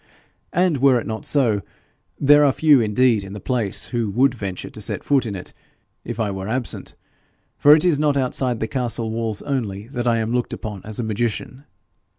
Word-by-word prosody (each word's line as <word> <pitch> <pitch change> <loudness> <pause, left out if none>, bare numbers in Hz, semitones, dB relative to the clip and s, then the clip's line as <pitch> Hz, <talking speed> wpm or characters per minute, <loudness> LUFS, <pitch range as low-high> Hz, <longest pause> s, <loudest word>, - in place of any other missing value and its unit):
And 175 -3 +2
were 130 -2 +4
it - - -7
not 110 -1 -5
so, 115 -8 +2 0.6
there 145 +1 +6
are 140 - +5
few 145 -2 +4
indeed 110 0 +2
in 95 0 -8
the 105 - -6
place 110 -2 -1
who 120 -4 -1
would 125 +6 +3
venture 100 -6 -5
to 105 - -9
set 105 - -3
foot 135 -4 +2
in 100 - -4
it 90 - -8 0.5
if 120 0 -6
I 105 -3 0
were 95 0 -5
absent, 125 +2 -3 0.6
for 145 +1 +7
it 155 - +2
is 165 -5 +3
not 150 -2 +2
outside 125 -2 0
the 110 - 0
castle 120 -3 -2
walls 110 -2 -3
only 110 -6 -3
that 125 -3 -3
I 115 -1 +3
am 115 +1 -1
looked 125 -1 -1
upon 105 -4 -6
as 110 +1 -5
a - - -1
magician. 115 +5 -3
120 Hz, 200 wpm, -21 LUFS, 110-135 Hz, 0.6 s, for